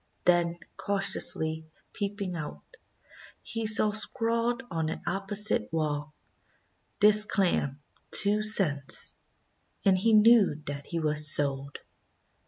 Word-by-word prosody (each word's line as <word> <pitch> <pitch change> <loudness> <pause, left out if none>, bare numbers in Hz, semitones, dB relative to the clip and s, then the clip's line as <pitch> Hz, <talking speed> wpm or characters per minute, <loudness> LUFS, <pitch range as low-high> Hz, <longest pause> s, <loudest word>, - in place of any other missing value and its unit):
Then, 175 -1 +1 0.2
cautiously 160 -5 +1 0.3
peeping 200 -3 -5
out, 150 - -9 0.8
he 225 -1 -5
saw 215 0 +5
scrawled 230 +3 -1
on 160 -1 -3
an - - -7
opposite 195 - 0
wall: 150 -2 -4 0.8
'This 210 0 +4
clam, 145 -9 -2 0.3
two 210 +1 +2
cents,' 175 -10 +1 0.7
and 195 -1 +3
he 220 +5 0
knew 215 -7 +4
that 140 -1 -7
he 170 - -5
was 150 -1 +1
sold. 140 -1 +2
185 Hz, 105 wpm, -26 LUFS, 150-210 Hz, 0.8 s, saw